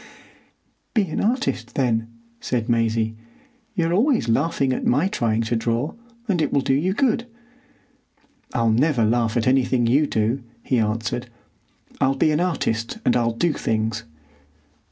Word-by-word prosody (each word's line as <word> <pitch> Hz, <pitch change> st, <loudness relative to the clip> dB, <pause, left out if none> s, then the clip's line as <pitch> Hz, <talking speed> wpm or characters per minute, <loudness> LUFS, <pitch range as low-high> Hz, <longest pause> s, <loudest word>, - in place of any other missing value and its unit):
"Be 215 Hz, -, +4 dB
an -, -, -2 dB
artist, 215 Hz, -, -1 dB
then," 115 Hz, -4 st, +1 dB, 0.3 s
said 120 Hz, -2 st, -2 dB
Maisie. 115 Hz, -2 st, +1 dB, 0.6 s
"You're 170 Hz, -3 st, +1 dB
always 230 Hz, -, +2 dB
laughing 135 Hz, +2 st, +1 dB
at -, -, -3 dB
my 145 Hz, +9 st, +2 dB
trying 115 Hz, -, 0 dB
to 115 Hz, +1 st, -1 dB
draw; 115 Hz, +5 st, -1 dB, 0.3 s
and 180 Hz, -6 st, +1 dB
it -, -, 0 dB
will 140 Hz, -, +2 dB
do 135 Hz, -, +1 dB
you 170 Hz, +8 st, +1 dB
good." 245 Hz, -2 st, +1 dB, 1.2 s
"I'll 115 Hz, -2 st, +2 dB
never 125 Hz, 0 st, +2 dB
laugh 115 Hz, 0 st, +1 dB
at 115 Hz, -, +1 dB
anything 130 Hz, -1 st, +2 dB
you 140 Hz, +6 st, +3 dB
do," 115 Hz, +4 st, 0 dB, 0.2 s
he 125 Hz, -, +1 dB
answered. 115 Hz, +3 st, -1 dB, 0.7 s
"I'll 135 Hz, +1 st, +2 dB
be 155 Hz, +3 st, +2 dB
an 150 Hz, -, +1 dB
artist, 120 Hz, -, -1 dB
and -, -, +3 dB
I'll 115 Hz, -1 st, +1 dB
do 160 Hz, +7 st, +1 dB
things." 110 Hz, -3 st, -1 dB
125 Hz, 150 wpm, -22 LUFS, 115-155 Hz, 1.2 s, Be